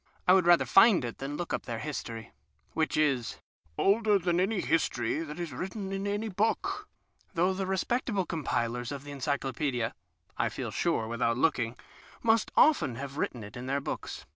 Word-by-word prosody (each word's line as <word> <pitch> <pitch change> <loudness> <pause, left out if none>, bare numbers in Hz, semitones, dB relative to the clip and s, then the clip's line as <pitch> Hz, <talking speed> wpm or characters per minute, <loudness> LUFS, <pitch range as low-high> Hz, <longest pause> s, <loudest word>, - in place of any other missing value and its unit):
I 180 - +8
would 185 -2 +4
rather 175 -1 +6
find 195 - +6
it 120 - -6
than 140 +2 -4
look 175 - -4
up - - -3
their 115 -2 -3
history, 115 -5 -5 0.4
which 160 -1 0
is 135 -7 +1 0.2
" 80 +2 -36
older 210 +1 +4
than 175 -2 +1
any 195 +2 +1
history 125 -7 0
that 155 0 -6
is 170 -5 -4
written 190 - -5
in 195 +1 -2
any 205 +2 -1
book," 210 +2 -1 0.5
though 180 +3 +3
the 190 0 -3
respectable 195 +1 0
compilers 120 -7 -2
of 140 0 -6
Encyclopaedias 135 -3 -2 0.5
(I - - +2
feel - - -5
sure 110 - 0
without 115 0 0
looking) 125 -5 +1 0.5
must 225 -1 +3
often 265 - +5
have 140 +3 -6
written 120 -7 -2
it 105 0 -10
in 125 +1 -6
their 140 +1 +1
books. 140 - -5
155 Hz, 175 wpm, -29 LUFS, 125-190 Hz, 0.5 s, I